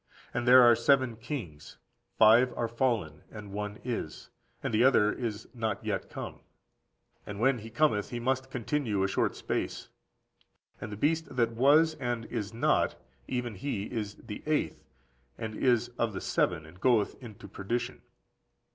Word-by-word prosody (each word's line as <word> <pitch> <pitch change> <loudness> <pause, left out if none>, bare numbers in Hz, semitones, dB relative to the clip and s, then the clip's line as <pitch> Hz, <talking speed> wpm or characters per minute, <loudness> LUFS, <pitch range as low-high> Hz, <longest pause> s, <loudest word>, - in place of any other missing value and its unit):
And 120 0 -2
there 125 0 +9
are 120 -1 +7
seven 130 -2 +3
kings: 110 - -7 0.4
five 115 +3 +6
are 115 - 0
fallen, 115 - -1
and 105 -2 -10
one 105 +1 -4
is, 115 -11 -5 0.3
and - - -2
the 110 +2 +4
other 105 -5 +4
is 110 -3 -4
not 110 -4 -3
yet - - -2
come; - - -7 0.8
and 100 -1 -7
when 130 +1 +3
he 110 +1 -9
cometh, 115 -4 +1
he 120 - -4
must 130 +2 -1
continue 120 -5 -1
a - - +2
short 95 - 0
space. - - -3 0.9
And 105 - -6
the 105 - -6
beast 160 +3 0
that 115 -2 +2
was 145 +7 +4
and 120 -2 -2
is 110 -4 -4
not, 115 - +1 0.3
(even 125 -2 -2
he 105 0 -3
is 105 -4 -4
the 105 -3 -9
eighth,) 155 -1 -1 0.5
and 110 -1 -5
is 120 +1 +2
of 115 -2 0
the 95 - -5
seven, 80 -3 0
and 85 +4 -16
goeth 120 -5 +3
into 110 -4 -10
perdition. 100 +5 -4
115 Hz, 160 wpm, -29 LUFS, 105-125 Hz, 0.9 s, there